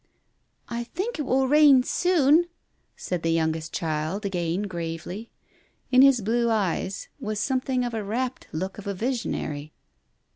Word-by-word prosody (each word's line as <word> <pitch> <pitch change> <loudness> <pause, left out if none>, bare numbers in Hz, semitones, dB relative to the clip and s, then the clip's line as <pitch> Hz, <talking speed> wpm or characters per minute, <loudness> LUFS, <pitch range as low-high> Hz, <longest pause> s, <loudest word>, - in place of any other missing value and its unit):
" - - -48 0.3
I 235 0 -4
think 385 - -4
it 290 - -2
will 265 +1 +2
rain 285 -2 +6
soon! 335 0 +3 0.2
" - - -45
said 180 -2 -3
the 165 - 0
youngest 160 -1 0
child 160 +5 -2
again 180 0 -1
gravely. 175 +3 -5 0.6
In 255 0 +7
his 270 -3 +6
blue 235 +3 +1
eyes 195 -2 -1
was 215 -1 -3
something 255 +1 0
of 240 - -2
the 220 -2 -3
rapt 245 +5 -3
look 190 +5 -4
of 205 - -9
a 200 - -2
visionary. 180 - -3
215 Hz, 155 wpm, -25 LUFS, 175-260 Hz, 0.6 s, In